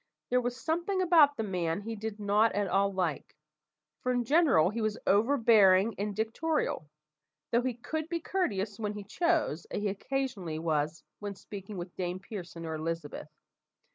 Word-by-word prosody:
There 250 Hz, 0 st, +4 dB
was 245 Hz, +1 st, -3 dB
something 345 Hz, +5 st, -1 dB
about 325 Hz, -6 st, +5 dB
the 225 Hz, -, -1 dB
man 180 Hz, -3 st, -1 dB
he 225 Hz, +2 st, -5 dB
did 215 Hz, 0 st, -5 dB
not 210 Hz, +2 st, +3 dB
at 205 Hz, -1 st, 0 dB
all 195 Hz, +2 st, +2 dB
like, 180 Hz, -6 st, -2 dB, 0.7 s
for 255 Hz, -, 0 dB
in 245 Hz, -1 st, +1 dB
general 245 Hz, -, +4 dB
he 230 Hz, +1 st, -3 dB
was 215 Hz, -1 st, 0 dB
overbearing 220 Hz, -3 st, +5 dB
and 205 Hz, 0 st, -2 dB
dictatorial, 225 Hz, -, -1 dB, 0.6 s
though 235 Hz, -, +4 dB
he 250 Hz, -1 st, -2 dB
could 315 Hz, +6 st, -4 dB
be 340 Hz, -, -1 dB
courteous 215 Hz, -, -2 dB
when 210 Hz, -1 st, -2 dB
he 210 Hz, -1 st, -6 dB
chose, 310 Hz, -, 0 dB
as -, -, -4 dB
he 205 Hz, -, +1 dB
occasionally 200 Hz, -6 st, -3 dB
was 155 Hz, 0 st, -1 dB, 0.2 s
when 205 Hz, -1 st, -5 dB
speaking 200 Hz, +1 st, -8 dB
to 175 Hz, -, -3 dB
Dame 180 Hz, 0 st, -2 dB
Pearson 175 Hz, -4 st, -8 dB
or 160 Hz, -, -3 dB
Elizabeth. 160 Hz, -1 st, -4 dB
210 Hz, 170 wpm, -30 LUFS, 185-250 Hz, 0.7 s, about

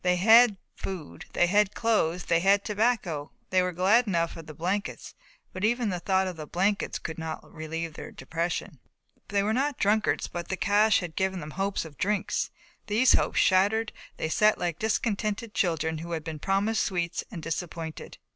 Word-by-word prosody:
They 180 Hz, 0 st, +3 dB
had 220 Hz, +3 st, +6 dB, 0.2 s
food, 160 Hz, -, -7 dB
they -, -, +4 dB
had 205 Hz, +2 st, +2 dB
clothes, 180 Hz, -7 st, +1 dB
they 165 Hz, -, +3 dB
had 195 Hz, +3 st, +3 dB
tobacco. 205 Hz, -9 st, 0 dB, 0.2 s
They 185 Hz, 0 st, +4 dB
were 180 Hz, 0 st, 0 dB
glad 200 Hz, +7 st, +3 dB
enough 170 Hz, -4 st, 0 dB
of 165 Hz, -1 st, -10 dB
the 155 Hz, -, -9 dB
blankets, 185 Hz, +6 st, -3 dB, 0.4 s
but 185 Hz, -, -6 dB
even 235 Hz, +1 st, +2 dB
the 180 Hz, -2 st, -2 dB
thought 190 Hz, +2 st, +1 dB
of 185 Hz, -3 st, -5 dB
the 155 Hz, -1 st, -7 dB
blankets 195 Hz, +5 st, 0 dB
could 160 Hz, 0 st, -6 dB
not 160 Hz, -1 st, -5 dB
relieve 160 Hz, 0 st, -5 dB
their -, -, -8 dB
depression. 165 Hz, 0 st, -4 dB, 0.5 s
They 200 Hz, 0 st, +1 dB
were 215 Hz, +2 st, +1 dB
not 275 Hz, +3 st, 0 dB
drunkards, 215 Hz, +1 st, +2 dB
but 175 Hz, 0 st, -6 dB
the 190 Hz, -, -3 dB
cache 205 Hz, +3 st, +3 dB
had 170 Hz, -3 st, -6 dB
given 190 Hz, -1 st, 0 dB
them 155 Hz, -2 st, -7 dB
hopes 195 Hz, +1 st, -2 dB
of 150 Hz, -3 st, -12 dB
drinks. 205 Hz, +1 st, 0 dB, 0.4 s
These 225 Hz, +4 st, +4 dB
hopes -, -, +1 dB
shattered 205 Hz, +4 st, +3 dB, 0.2 s
they -, -, -2 dB
sat 210 Hz, +5 st, +4 dB
like 170 Hz, -3 st, -2 dB
discontented 220 Hz, 0 st, -1 dB
children 160 Hz, -3 st, 0 dB
who 170 Hz, +1 st, -6 dB
had 160 Hz, -2 st, -3 dB
been 155 Hz, -1 st, -6 dB
promised 195 Hz, +5 st, +1 dB
sweets 175 Hz, -3 st, -2 dB
and 170 Hz, -7 st, -8 dB
disappointed. 165 Hz, -1 st, -5 dB
185 Hz, 185 wpm, -27 LUFS, 165-210 Hz, 0.5 s, had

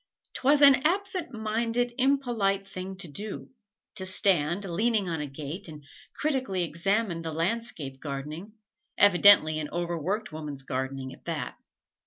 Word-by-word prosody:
'T -, -, -4 dB
was 290 Hz, +2 st, +5 dB
an 280 Hz, -1 st, +10 dB
absent 370 Hz, +3 st, -1 dB
minded, 230 Hz, +2 st, -1 dB
impolite 240 Hz, -8 st, +1 dB
thing 190 Hz, 0 st, -6 dB
to 185 Hz, -2 st, -4 dB
do 200 Hz, +8 st, -6 dB, 0.4 s
to 195 Hz, -, -1 dB
stand 185 Hz, -1 st, +2 dB
leaning 205 Hz, +3 st, +1 dB
on 165 Hz, -3 st, -2 dB
a 150 Hz, -, -4 dB
gate 150 Hz, +7 st, -6 dB
and 150 Hz, -2 st, -10 dB, 0.3 s
critically 260 Hz, -, -1 dB
examine 175 Hz, +2 st, -1 dB
the 165 Hz, -1 st, -4 dB
landscape 165 Hz, -, -3 dB
gardening, 150 Hz, +8 st, -6 dB, 0.4 s
evidently 180 Hz, -5 st, +6 dB
an 150 Hz, -1 st, -4 dB
overworked 175 Hz, +5 st, -2 dB
woman's 150 Hz, -3 st, -6 dB
gardening, 130 Hz, 0 st, -4 dB
at -, -, -17 dB
that. -, -, -4 dB
190 Hz, 140 wpm, -27 LUFS, 155-230 Hz, 0.4 s, an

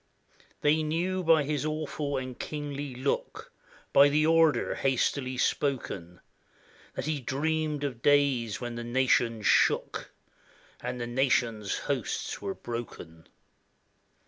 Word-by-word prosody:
They 150 Hz, +2 st, +3 dB
knew 175 Hz, +4 st, -1 dB
by 160 Hz, -2 st, +5 dB
his 145 Hz, 0 st, -2 dB
awful 155 Hz, -2 st, -2 dB
and 130 Hz, -1 st, -5 dB
kingly 145 Hz, -3 st, -5 dB
look, 130 Hz, +3 st, -3 dB, 0.4 s
By 140 Hz, +1 st, +7 dB
the 150 Hz, +2 st, +2 dB
order 165 Hz, -1 st, +3 dB
hastily 130 Hz, 0 st, 0 dB
spoken, 100 Hz, -, -1 dB, 0.7 s
That -, -, -3 dB
he 155 Hz, -1 st, -1 dB
dreamed 150 Hz, +3 st, -1 dB
of 125 Hz, -5 st, -3 dB
days 140 Hz, -6 st, +2 dB
when 120 Hz, -1 st, -5 dB
the 120 Hz, 0 st, -5 dB
nations 120 Hz, -2 st, +1 dB
shook, -, -, +2 dB, 0.7 s
And 125 Hz, 0 st, -4 dB
the 120 Hz, -, -2 dB
nations' 120 Hz, -4 st, +1 dB
hosts -, -, -2 dB
were 100 Hz, -1 st, -3 dB
broken. 100 Hz, -9 st, -7 dB
135 Hz, 120 wpm, -28 LUFS, 120-150 Hz, 0.7 s, By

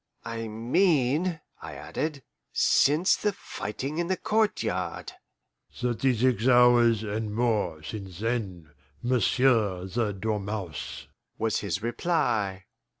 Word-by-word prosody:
"I 115 Hz, -1 st, -4 dB
mean," 145 Hz, -, +1 dB, 0.2 s
I -, -, -8 dB
added, 150 Hz, -3 st, -4 dB, 0.3 s
"since 155 Hz, +7 st, +4 dB
the 210 Hz, -1 st, -1 dB
fighting 135 Hz, -, -5 dB
in 175 Hz, -, 0 dB
the 185 Hz, 0 st, 0 dB
courtyard." 95 Hz, -, -1 dB, 0.6 s
"Thirty 125 Hz, +1 st, 0 dB
six 125 Hz, 0 st, +2 dB
hours 120 Hz, -3 st, +5 dB
and 105 Hz, 0 st, -3 dB
more 105 Hz, -10 st, 0 dB
since 95 Hz, -1 st, -7 dB
then, 100 Hz, -8 st, -3 dB, 0.3 s
m'sieu' 120 Hz, -5 st, +2 dB
the 105 Hz, +3 st, -1 dB
dormouse," 100 Hz, -4 st, -4 dB, 0.3 s
was 110 Hz, -1 st, 0 dB
his 100 Hz, 0 st, -3 dB
reply. 115 Hz, -, 0 dB
115 Hz, 105 wpm, -27 LUFS, 100-130 Hz, 0.6 s, hours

